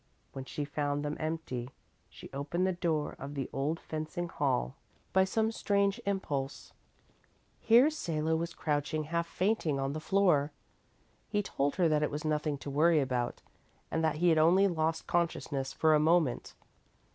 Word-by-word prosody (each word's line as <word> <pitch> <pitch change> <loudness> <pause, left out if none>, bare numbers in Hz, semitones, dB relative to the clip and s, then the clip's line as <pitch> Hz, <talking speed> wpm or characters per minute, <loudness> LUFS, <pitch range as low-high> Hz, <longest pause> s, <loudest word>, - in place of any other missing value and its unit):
When 135 -1 -6
she 145 +2 -4
found 145 0 -2
them 150 +1 -2
empty, 155 -6 -3 0.4
she - - -12
opened 150 +6 -1
the 185 - +1
door 160 -4 -1
of 140 +2 -7
the 135 -2 -2
old 145 +4 -1
fencing 160 +2 -4
hall - - -1 0.4
by 190 0 +5
some 220 +3 0
strange 200 0 +1
impulse. 145 -9 -3 0.9
Here 245 +7 +5
Salo 160 - -1
was 170 +1 -3
crouching 150 0 -1
half 170 +2 -2
fainting 175 -6 0
on 135 +1 -1
the 155 - -3
floor. 160 -5 +2 0.8
He 205 0 0
told 140 -6 -1
her 175 -3 +3
that 155 -1 +2
it 150 - +1
was 150 +2 -5
nothing 150 -1 0
to - - -3
worry 160 +3 +4
about, 125 -3 -2 0.5
and 160 - 0
that 160 -1 +2
he 175 +3 +3
had 160 -1 +4
only 180 +5 +5
lost 160 -2 -1
consciousness 155 -5 -1
for 160 -1 +3
a 150 - +5
moment. 160 -4 +1
155 Hz, 165 wpm, -31 LUFS, 145-175 Hz, 0.9 s, by